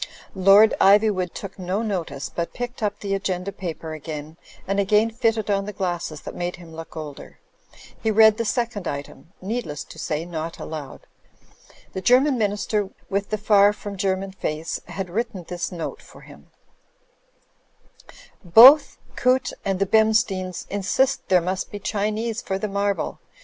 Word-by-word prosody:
Lord 195 +3 +6
Ivjrwood 195 -2 +4
took 195 -1 -8
no 185 +4 -2
notice, 165 -10 -3
but 170 0 -4
picked 245 0 -5
up 205 -1 -1
the 200 -1 -2
agenda 195 -1 -2
paper 165 -4 -6
again, 155 0 -7 0.3
and 195 +1 0
again 210 +3 +3
fitted 225 -2 0
on 195 0 0
the 210 - -6
glasses 175 -5 -3
that - - -8
made 175 0 -3
him 170 -2 -13
look 165 0 -9
older. 150 -3 -8 0.6
He 220 - 0
read 220 0 +6
the 230 - 0
second 230 -4 -2
item 145 +4 -7
— - - -36
needless 195 - -3
to - - -13
say, 155 +2 -2
not 165 -1 -5
aloud. 155 -4 -7 0.9
The 190 - -4
German 255 +4 +4
Minister 205 -1 0 0.2
with 200 +1 -1
the 215 - -1
far 205 -1 +5
from 205 -1 -7
German 190 0 -1
face, 160 -3 -4
had 195 -2 -5
written 210 -3 -3
this 175 +1 -4
note 170 -3 -5
for - - -16
him: - - -15 2.0
"Both 240 - +8 0.2
Coote 255 +1 +2
and 195 -1 0
the 195 - +1
Bemsteins 215 -3 +1
insist 205 +7 0
there 185 -2 +5
must 185 +2 -3
be 205 - -6
Chinese 215 +3 -2
for 190 - -3
the 215 - -3
marble. 200 0 -2
195 Hz, 160 wpm, -23 LUFS, 175-215 Hz, 2.0 s, Both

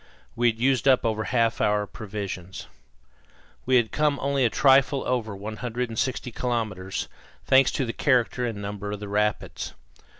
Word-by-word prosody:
We 120 0 +3
had 110 - -3
used 130 +1 +1
up 130 -3 +4
over 110 -1 0
half 115 -1 +1
our 105 0 +2
provisions. 100 -4 -6 1.0
We 130 - +4
had 120 -3 +3
come 150 -2 +1
only 140 -1 +1
a 120 - +4
trifle 135 +2 +4
over 115 -5 -1
160 120 +4 -3
kilometres, 110 -6 -3 0.4
thanks 130 0 +5
to 135 - 0
the 115 - -4
character 125 -2 +1
and 115 -4 -3
number 100 0 -5
of 105 - -5
the 105 - -6
rapids. 105 +1 -2
115 Hz, 155 wpm, -25 LUFS, 105-130 Hz, 1.0 s, thanks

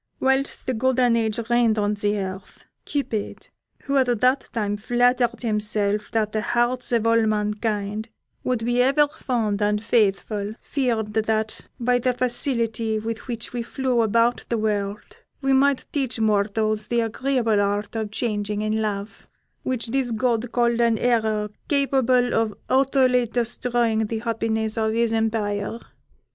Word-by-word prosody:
Whilst 265 +1 0
the 260 - -1
golden 250 0 +2
age 220 -2 0
reigned 240 -2 +3
on 205 0 +1
the 205 0 -1
earth, 190 -1 -6 0.2
Cupid, 235 -8 -3 0.3
who 280 0 0
at 245 -4 +2
that 255 +3 +2
time 205 -3 -1
flattered 245 +2 +1
himself 210 -2 0
that 215 -2 0
the 215 - -1
hearts 240 +3 0
of 230 -2 +2
all 230 -1 +3
mankind 210 0 -1 0.3
would 245 -3 -1
be 240 +1 +2
ever 275 +3 +4
fond 235 -9 -2
and 210 +1 +1
faithful, 210 -1 +1
feared 230 -6 -1
that 220 0 -1
by 245 +1 +2
the 250 0 0
facility 230 -3 0
with 225 +3 -5
which 235 -1 -5
we 240 - -2
flew 250 0 0
about 230 +2 +2
the 235 - 0
world, 210 - -3 0.2
we 270 -1 +1
might 275 0 +3
teach 265 -5 -2
mortals 215 0 +1
the 235 -1 +1
agreeable 230 -2 +1
art 205 +2 -1
of 220 -2 -2
changing 210 -2 -2
in 215 +1 0
love, 205 -1 -4 0.3
which 245 -3 -3
this 260 0 0
god 235 0 0
called 235 -1 +2
an 230 -1 +3
error 220 -3 +1 0.2
capable 260 -3 +2
of 225 -2 +1
utterly 260 -2 +3
destroying 235 -1 0
the 225 - -3
happiness 220 -1 -1
of 220 0 +1
his 230 0 +1
empire. 220 -1 -1
225 Hz, 150 wpm, -23 LUFS, 215-245 Hz, 0.3 s, ever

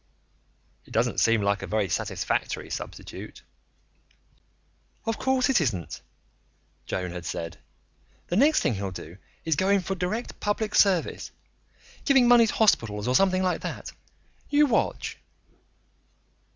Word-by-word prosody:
"It - - -19
doesn't - - +1
seem 115 -2 +3
like 100 0 +1
a - - -5
very 105 -2 0
satisfactory - - -2
substitute." - - -8 1.6
"Of 225 - -2
course 265 -1 +2
it 265 -9 +3
isn't," 95 - -3 0.9
Joan 90 -2 -3
had 90 -1 -6
said. 85 0 -5 0.7
"The 175 - -3
next 290 +9 +4
thing - - +1
he'll 100 -1 -3
do 90 -1 -9 0.3
is 160 -2 +2
go 190 +6 +1
in 200 -1 +4
for 190 +2 -3
direct 190 +6 -3
public 210 +1 -1
service 190 -5 +2 0.7
giving 265 -4 +5
money 240 -2 +7
to - - -2
hospitals 115 - +2
or 125 - +2
something 185 +4 +3
like 180 -1 0
that. - - -6 0.6
You 295 0 +5
watch." 250 -6 -1
185 Hz, 135 wpm, -26 LUFS, -, 1.6 s, money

